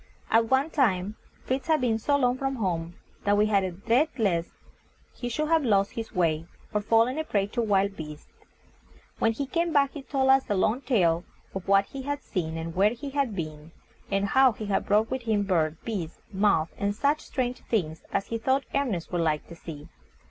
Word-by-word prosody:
At 225 0 +4
one 265 +5 +2
time, 210 -8 +1 0.3
Fritz 265 +4 -2
had 315 -1 +3
been 230 -3 +1
so 285 +6 +2
long 250 -2 +2
from 270 +1 -2
home 175 -6 -2 0.3
that 205 0 +3
we 210 - +4
had 200 -2 +2
a 185 - -1
dread 230 - +2
lest 175 -7 +1 0.6
he 245 - -5
should 305 +6 -1
have 325 -2 +4
lost 200 -5 +2
his 225 -1 -6
way, 165 -3 0 0.3
or 210 - +1
fallen 230 +6 +3
a - - 0
prey 200 -9 0
to 235 +4 -2
wild 200 -2 +2
beasts. 150 -2 -9 0.9
When 225 - +3
he 280 +5 -3
came 335 +5 0
back 280 -2 +3
he 290 - -7
told 265 -1 +2
us 270 0 +3
a 205 - +2
long 215 +7 +1
tale 175 -11 +2 0.3
of 190 -2 -6
what 195 0 +5
he 275 - -7
had 285 +1 -3
seen 165 -4 -3
and 165 0 -5
where 205 +4 +4
he 275 +4 -7
had 270 -6 0
been, 155 -2 -6 0.4
and 195 0 +1
how 260 +4 +5
he 215 - -6
had 200 -1 -1
brought 215 +3 +3
with 260 0 -1
him 220 -3 +1
birds, 165 -5 +1
beasts, 185 -8 -4 0.2
moths, 190 -5 +2
and 200 0 0
such 290 +6 +1
strange 250 -2 -2
things 160 -8 -1
as 195 - 0
he 230 - -3
thought 265 +4 +1
Ernest 240 -12 -1
would 175 -2 0
like 155 -2 0
to 170 - -9
see. 155 -3 -9
215 Hz, 210 wpm, -27 LUFS, 180-265 Hz, 0.9 s, what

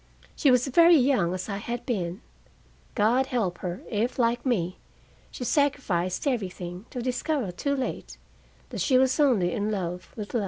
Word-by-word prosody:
She 290 - +3
was 250 -1 +4
very 335 +5 +6
young, 250 - +3
as 185 0 -4
I 200 -2 -3
had 235 +4 -5
been. 190 -4 -2 0.7
God 240 +5 +3
help 200 -10 -1
her, 180 0 -5
if, 225 +4 -1
like 240 -1 +1
me, 185 -9 -1 0.5
she - - -7
sacrificed 245 - 0
everything, 185 -6 -3
to 245 - -5
discover, 255 - -1
too 280 +10 -1
late, 265 -2 -4 0.5
that - - -4
she 260 -3 +3
was 260 +3 +2
only 230 -12 +3
in 205 +3 -1
love 180 -4 -4
with 210 -2 -7
love! 240 - +2
235 Hz, 165 wpm, -26 LUFS, 185-260 Hz, 0.7 s, very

